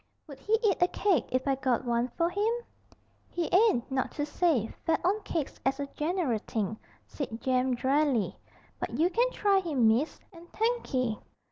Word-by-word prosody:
'Would 280 Hz, -4 st, -11 dB
he 430 Hz, -, -2 dB
eat 405 Hz, -5 st, +2 dB
a 355 Hz, -, +6 dB
cake 360 Hz, -, +1 dB
if 255 Hz, +2 st, 0 dB
I 275 Hz, -, +3 dB
got 260 Hz, -2 st, 0 dB
one 235 Hz, 0 st, +1 dB
for 335 Hz, -, +3 dB
him?' 420 Hz, +4 st, +1 dB, 0.8 s
'He 345 Hz, -2 st, -2 dB
ain't, 365 Hz, -, +3 dB
not 265 Hz, -1 st, 0 dB
to 290 Hz, -, -2 dB
say, 295 Hz, -, +1 dB
fed 325 Hz, -2 st, +1 dB
on 405 Hz, +4 st, +2 dB
cakes 320 Hz, -8 st, -3 dB
as 270 Hz, +1 st, 0 dB
a 285 Hz, -, -1 dB
general 305 Hz, -, 0 dB
thing,' 220 Hz, -1 st, -2 dB, 0.3 s
said 240 Hz, -6 st, -5 dB
Jem 255 Hz, 0 st, +1 dB
drily, 270 Hz, -3 st, +1 dB, 0.4 s
'but -, -, -4 dB
you 340 Hz, +4 st, +3 dB
can 485 Hz, +4 st, +2 dB
try 405 Hz, -5 st, +2 dB
him, 290 Hz, -11 st, +2 dB
miss, 240 Hz, +8 st, +1 dB
and 340 Hz, 0 st, -14 dB
thankee.' 275 Hz, -, 0 dB
290 Hz, 175 wpm, -29 LUFS, 255-360 Hz, 0.8 s, a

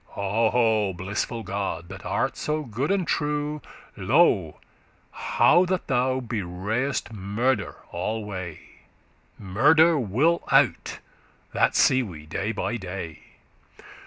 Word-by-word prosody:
O 110 Hz, 0 st, +2 dB
blissful 100 Hz, +6 st, -3 dB
God! 95 Hz, -4 st, -4 dB
that -, -, -9 dB
art -, -, -1 dB
so 155 Hz, 0 st, -2 dB
good 125 Hz, +4 st, -3 dB
and 195 Hz, -2 st, +1 dB
true, 150 Hz, 0 st, -1 dB, 0.3 s
Lo, 100 Hz, -, +2 dB, 0.5 s
how 175 Hz, -, +3 dB
that 185 Hz, 0 st, -1 dB
thou 130 Hz, 0 st, +1 dB
bewray'st 110 Hz, +3 st, -3 dB
murder 105 Hz, +4 st, -1 dB, 0.2 s
alway. 95 Hz, -3 st, -4 dB, 0.8 s
Murder 155 Hz, -, +4 dB
will 135 Hz, -, +1 dB
out, 135 Hz, -2 st, +2 dB, 0.6 s
that -, -, +2 dB
see 130 Hz, -, +4 dB
we 85 Hz, -10 st, -8 dB
day 95 Hz, +7 st, -3 dB
by 115 Hz, +2 st, -2 dB
day. 90 Hz, -5 st, -7 dB
110 Hz, 105 wpm, -25 LUFS, 95-135 Hz, 0.8 s, Murder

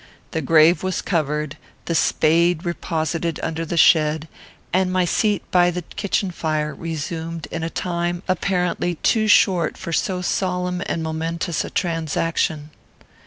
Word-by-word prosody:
The 160 Hz, -, -1 dB
grave 160 Hz, +4 st, +5 dB
was 185 Hz, 0 st, -1 dB
covered, 150 Hz, -4 st, -1 dB, 0.3 s
the 170 Hz, -, -1 dB
spade 165 Hz, +2 st, +2 dB
reposited 165 Hz, -1 st, -2 dB
under 160 Hz, 0 st, -2 dB
the 170 Hz, -, -3 dB
shed, 155 Hz, -1 st, +4 dB, 0.5 s
and 185 Hz, 0 st, +2 dB
my 185 Hz, -1 st, +2 dB
seat 205 Hz, +1 st, +1 dB
by 175 Hz, -1 st, +5 dB
the 180 Hz, 0 st, -4 dB
kitchen 195 Hz, +1 st, -2 dB
fire 155 Hz, -2 st, -2 dB
resumed 165 Hz, 0 st, -5 dB
in 165 Hz, -, -3 dB
a 165 Hz, -, -2 dB
time 175 Hz, +1 st, -2 dB
apparently 180 Hz, -1 st, 0 dB
too 215 Hz, -1 st, +3 dB
short 180 Hz, -5 st, +4 dB
for 170 Hz, -, -5 dB
so 180 Hz, +1 st, 0 dB
solemn 180 Hz, -1 st, -1 dB
and 165 Hz, -, -2 dB
momentous 165 Hz, +2 st, -2 dB
a -, -, -6 dB
transaction. 165 Hz, -2 st, -1 dB
170 Hz, 140 wpm, -22 LUFS, 160-180 Hz, 0.5 s, grave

